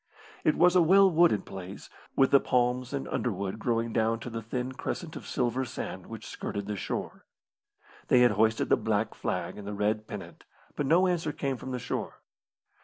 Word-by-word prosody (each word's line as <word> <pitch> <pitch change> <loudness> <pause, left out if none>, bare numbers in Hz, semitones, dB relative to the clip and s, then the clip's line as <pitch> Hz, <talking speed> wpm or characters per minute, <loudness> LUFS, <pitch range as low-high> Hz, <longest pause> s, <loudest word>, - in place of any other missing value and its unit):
It 155 - +3
was 180 +1 +5
a 180 - +7
well 190 +3 +6
wooded 165 - +4
place, 95 0 -8 0.3
with 135 - +4
the 140 - +7
palms 125 0 +1
and 140 -1 -3
underwood 100 -2 -2
growing 115 0 0
down 115 +1 +1
to 120 - -6
the 115 0 -4
thin 125 +3 -3
crescent 160 +5 -5
of - - -8
silver 125 +1 0
sand 125 - -6
which - - -8
skirted 100 -1 -5
the 105 0 -3
shore. - - -4 0.8
They 125 - +5
had 125 - +6
hoisted 110 +2 +2
the - - +5
black - - 0
flag - - -3
and 100 - -8
the 105 - -4
red 105 +1 0
pennant, - - -8 0.3
but 145 - -1
no 170 +5 +5
answer 170 -4 0
came 140 -2 -2
from 130 - -8
the 125 - -2
shore. 125 - -4
125 Hz, 190 wpm, -29 LUFS, 110-145 Hz, 0.8 s, a